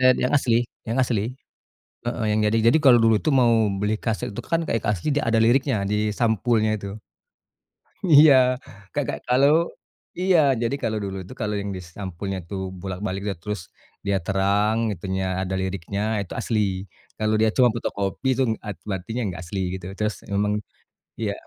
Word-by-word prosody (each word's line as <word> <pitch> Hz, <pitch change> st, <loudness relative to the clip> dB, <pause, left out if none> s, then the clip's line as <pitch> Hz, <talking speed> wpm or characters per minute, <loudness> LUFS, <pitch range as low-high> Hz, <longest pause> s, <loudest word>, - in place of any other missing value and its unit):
Iya, 130 Hz, -, +6 dB
dia -, -, -2 dB
yang -, -, -4 dB
asli 120 Hz, -4 st, +2 dB, 0.3 s
yang 115 Hz, -, -1 dB
asli. 120 Hz, -5 st, 0 dB, 0.8 s
Heeh, 120 Hz, -1 st, -2 dB
yang 110 Hz, -, +2 dB
jadi 110 Hz, +2 st, +2 dB
jadi 125 Hz, -, +4 dB
kalau 125 Hz, -4 st, +7 dB
dulu 115 Hz, -1 st, +4 dB
itu -, -, +2 dB
mau 125 Hz, -3 st, +4 dB, 0.3 s
beli 105 Hz, +2 st, +1 dB
kaset 110 Hz, -2 st, -3 dB
itu 120 Hz, -, -4 dB
kan 165 Hz, +2 st, -1 dB
kayak 115 Hz, -, -1 dB
asli, 100 Hz, -, -3 dB
dia 145 Hz, -, +1 dB
ada 115 Hz, -1 st, +2 dB
liriknya 130 Hz, +4 st, +3 dB
di 105 Hz, +1 st, 0 dB
sampulnya 110 Hz, 0 st, +1 dB
itu. 100 Hz, -1 st, -6 dB, 1.2 s
Iya, 150 Hz, -3 st, +8 dB, 0.6 s
Kakak, 145 Hz, -3 st, -1 dB
kalau 130 Hz, +3 st, +4 dB, 0.7 s
iya, 185 Hz, -2 st, +4 dB, 0.2 s
jadi 115 Hz, +3 st, 0 dB
kalau 110 Hz, -1 st, -1 dB
dulu 95 Hz, -1 st, -4 dB
itu -, -, -11 dB
kalau 105 Hz, -1 st, -1 dB
yang 100 Hz, 0 st, -4 dB
di -, -, -6 dB, 0.2 s
sampulnya 95 Hz, 0 st, -4 dB
tuh 100 Hz, -2 st, -3 dB, 0.2 s
bolak-balik, 95 Hz, +1 st, -4 dB
iya, 100 Hz, -, -1 dB
terus, 105 Hz, -1 st, -3 dB, 0.5 s
dia 100 Hz, -, +2 dB
terang 100 Hz, +2 st, +2 dB, 0.2 s
itunya, 95 Hz, +1 st, -3 dB, 0.2 s
ada 95 Hz, 0 st, -3 dB
liriknya 95 Hz, +1 st, -3 dB, 0.2 s
itu 90 Hz, -, -9 dB
asli. 110 Hz, -2 st, 0 dB, 0.6 s
Kalau 110 Hz, 0 st, +1 dB
dia 110 Hz, 0 st, +4 dB
cuma 125 Hz, -2 st, +6 dB
fotokopi 100 Hz, +1 st, -2 dB
itu -, -, +4 dB, 0.2 s
art 105 Hz, -2 st, -5 dB
berarti 95 Hz, 0 st, -4 dB
dia -, -, 0 dB
enggak 85 Hz, -3 st, -5 dB
asli, 95 Hz, +3 st, -4 dB
gitu. 95 Hz, -1 st, -7 dB
Terus 105 Hz, 0 st, 0 dB, 0.2 s
memang 105 Hz, +1 st, +1 dB, 0.7 s
iya. 105 Hz, -3 st, -1 dB
105 Hz, 175 wpm, -24 LUFS, 100-120 Hz, 1.2 s, Iya